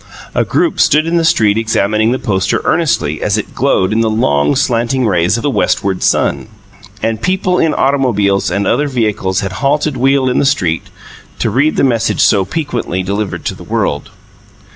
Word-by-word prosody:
A -, -, +1 dB
group 340 Hz, -, 0 dB
stood 155 Hz, +2 st, +3 dB
in 170 Hz, +1 st, 0 dB
the 165 Hz, -, +1 dB
street 110 Hz, -11 st, +2 dB
examining 110 Hz, 0 st, +1 dB
the 130 Hz, -, 0 dB
poster 95 Hz, -7 st, -1 dB
earnestly 85 Hz, -, 0 dB
as -, -, 0 dB
it -, -, -5 dB
glowed 95 Hz, +2 st, +1 dB
in 115 Hz, -, +1 dB
the 115 Hz, -, +1 dB
long, 75 Hz, -10 st, +1 dB
slanting 120 Hz, +2 st, 0 dB
rays 90 Hz, 0 st, +1 dB
of 115 Hz, -, -5 dB
the 145 Hz, -, +1 dB
westward 95 Hz, -7 st, 0 dB
sun, -, -, 0 dB, 0.6 s
and 115 Hz, -1 st, -1 dB
people 185 Hz, 0 st, 0 dB
in 160 Hz, -, +1 dB
automobiles 115 Hz, -8 st, +1 dB
and 100 Hz, +3 st, -1 dB
other 150 Hz, -, +1 dB
vehicles 105 Hz, -7 st, -1 dB
had 95 Hz, -2 st, -4 dB
halted 145 Hz, +1 st, 0 dB
wheel 135 Hz, +1 st, +2 dB
in 125 Hz, -, +1 dB
the -, -, +2 dB
street 90 Hz, -, 0 dB, 0.5 s
to -, -, -1 dB
read 145 Hz, +4 st, +1 dB
the -, -, +1 dB
message 120 Hz, -4 st, +1 dB
so 100 Hz, -3 st, +4 dB
piquantly 120 Hz, -, -3 dB
given 100 Hz, +2 st, -3 dB
to -, -, -2 dB
the -, -, -12 dB
world. -, -, -2 dB
115 Hz, 185 wpm, -14 LUFS, 100-140 Hz, 0.6 s, so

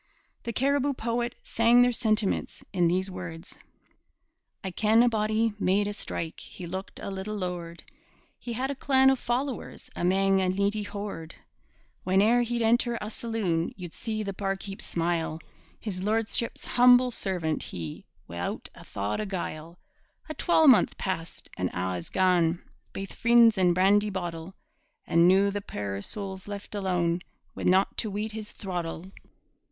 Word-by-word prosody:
The 235 Hz, -, -4 dB
Cariboo 280 Hz, +2 st, +1 dB
poet 235 Hz, +1 st, -2 dB
sang 235 Hz, +2 st, +4 dB
their 245 Hz, -, +3 dB
sentiments 220 Hz, -4 st, 0 dB
in 175 Hz, -3 st, +3 dB
these 185 Hz, +3 st, 0 dB
words: 170 Hz, -3 st, -8 dB, 1.0 s
I 190 Hz, -, -3 dB
ken 220 Hz, +5 st, +4 dB
a -, -, +4 dB
body 220 Hz, 0 st, +1 dB
made 200 Hz, +2 st, +2 dB
a 205 Hz, -, -2 dB
strike. 165 Hz, -5 st, -4 dB
He 180 Hz, -, -9 dB
looked 190 Hz, +3 st, -6 dB
a -, -, -5 dB
little 195 Hz, +2 st, -4 dB
lord. 175 Hz, -3 st, -5 dB, 0.6 s
He 240 Hz, -, -5 dB
had 260 Hz, +4 st, -1 dB
a -, -, -4 dB
clan 265 Hz, 0 st, +4 dB
o' -, -, +3 dB
followers 255 Hz, +1 st, -3 dB
Amang 195 Hz, +2 st, +2 dB
a 185 Hz, -, +1 dB
needy 200 Hz, +3 st, 0 dB
horde. 200 Hz, -6 st, -6 dB, 0.7 s
Whane'er 210 Hz, +6 st, +4 dB
he'd 240 Hz, 0 st, -1 dB
enter 235 Hz, +1 st, +3 dB
a 210 Hz, -, -5 dB
saloon, 205 Hz, -9 st, -1 dB
You'd 175 Hz, -3 st, -8 dB
see 215 Hz, -2 st, -3 dB
the 200 Hz, -1 st, -4 dB
barkeep 195 Hz, 0 st, -4 dB
smile 165 Hz, -1 st, -1 dB, 0.4 s
His 190 Hz, -4 st, -5 dB
lordship's 225 Hz, +3 st, -1 dB
humble 250 Hz, 0 st, +6 dB
servant 180 Hz, -8 st, -1 dB
he 80 Hz, -3 st, -6 dB, 0.2 s
Wi'out 85 Hz, +1 st, -4 dB
a -, -, -13 dB
thought 100 Hz, -, -3 dB
o' -, -, -2 dB
guile! 170 Hz, -3 st, -5 dB, 0.5 s
A 310 Hz, -, -4 dB
twalmonth 310 Hz, -8 st, +5 dB
passed 175 Hz, -3 st, -4 dB
an' 90 Hz, -1 st, 0 dB
a' 90 Hz, +1 st, -1 dB
is 85 Hz, -, -8 dB
gane, 175 Hz, -2 st, +2 dB, 0.3 s
Baith 195 Hz, 0 st, -6 dB
freends 235 Hz, -1 st, +5 dB
and 180 Hz, -3 st, +3 dB
brandy 205 Hz, +3 st, +4 dB
bottle! 175 Hz, -2 st, -5 dB, 0.5 s
An' 170 Hz, +1 st, +4 dB
noo 195 Hz, +2 st, +5 dB
the 205 Hz, 0 st, -3 dB
puir 100 Hz, -, -4 dB
soul's 190 Hz, -, -5 dB
left 205 Hz, 0 st, -7 dB
alane 180 Hz, -4 st, 0 dB, 0.3 s
Wi' -, -, -6 dB
nocht 190 Hz, +2 st, +3 dB
to 220 Hz, -, -1 dB
weet 210 Hz, +2 st, -3 dB
his 215 Hz, -1 st, -7 dB
throttle! 175 Hz, -1 st, -5 dB
195 Hz, 155 wpm, -27 LUFS, 175-225 Hz, 1.0 s, humble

